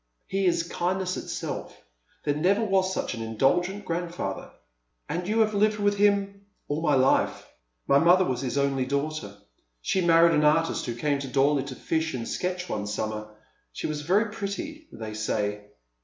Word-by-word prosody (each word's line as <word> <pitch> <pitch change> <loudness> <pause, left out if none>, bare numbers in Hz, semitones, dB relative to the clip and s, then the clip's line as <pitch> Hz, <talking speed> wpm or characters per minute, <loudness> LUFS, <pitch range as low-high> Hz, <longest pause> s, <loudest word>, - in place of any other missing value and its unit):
" - - -47
He 195 -1 +2
is 170 -1 +2
kindness 180 +2 -1
itself. - - -5 0.4
There 145 - +1
never 195 +9 +2
was 190 -2 +2
such - - -2
an 115 - -6
indulgent 175 - +1
grandfather." 170 - -3 0.3
" - - -49
And 175 +2 -2
yon 220 +2 +2
have 215 -1 +2
lived 210 +1 +2
with 205 -1 +1
him 200 -1 +2
" - - -48
" - - -47
All 145 +2 -2
my 150 -3 +3
life. 130 0 +2 0.4
My 140 - +5
mother 180 +3 +5
was 130 -4 -1
his 130 0 -2
only 135 -2 +1
daughter. 140 -7 -3 0.4
She 185 - 0
married 170 -1 +5
an 150 - +3
artist 160 0 +2
who 120 - -3
came 140 +3 0
to 140 - -5
Dorley 135 +1 +2
to 130 - -6
fish 160 0 -1
and 115 -2 -4
sketch 180 0 -2
one 105 -6 -3
summer. 105 0 -3 0.5
She - - -5
was 150 -1 -2
very 200 +8 +2
pretty, 295 +11 -5
they 110 -1 -7
say." 105 -1 -2
160 Hz, 185 wpm, -26 LUFS, 130-190 Hz, 0.5 s, My